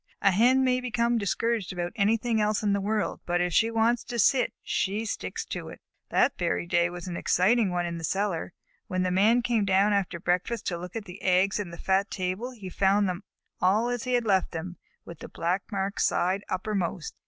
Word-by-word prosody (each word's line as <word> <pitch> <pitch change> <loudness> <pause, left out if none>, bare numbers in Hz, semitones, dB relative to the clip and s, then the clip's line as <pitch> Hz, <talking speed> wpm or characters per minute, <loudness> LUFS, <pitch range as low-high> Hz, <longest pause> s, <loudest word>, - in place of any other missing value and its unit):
A 200 - +6
Hen 245 +7 +4
may 255 -1 +2
become 235 -1 0
discouraged 220 0 -1
about 175 -1 -3
anything 225 +1 +1
else 210 0 0
in 205 -1 +2
the 200 - 0
world, 210 +1 -1
but 175 0 +1
if 175 -1 0
she 225 - +4
wants 230 +1 +1
to 240 - -5
sit, 250 +4 +3
she 205 +3 -1
sticks 215 - -4
to - - -6
it. - - -11 0.3
That - - +2
very 175 0 0
day 170 0 +2
was 175 0 -8
an 175 - -4
exciting 205 +5 +2
one 175 -1 -1
in 170 -1 -4
the - - -9
cellar. 190 0 -1 0.4
When 185 -3 -1
the 185 - 0
Man 220 +6 +4
came 235 -3 +1
down 195 +2 +3
after 190 -3 -1
breakfast 180 +7 -1
to 175 - -3
look 180 +2 -8
at 220 -2 -4
the 180 +2 -11
eggs 190 +2 +2
in 200 -4 -4
the 170 - -9
fat 195 +3 +1
table 185 +6 -3
he 225 -7 -10
found 195 +2 +2
them 180 +1 -3 0.4
all 205 +6 +3
as 245 0 -3
he 250 - -1
had 240 -1 +2
left 190 -4 +1
them, 175 +2 -5 0.3
with 170 -3 -10
the - - -9
black 180 +6 -2
marked 195 0 -2
side 190 +3 +1
uppermost. 185 -4 -2
200 Hz, 215 wpm, -27 LUFS, 180-225 Hz, 0.4 s, A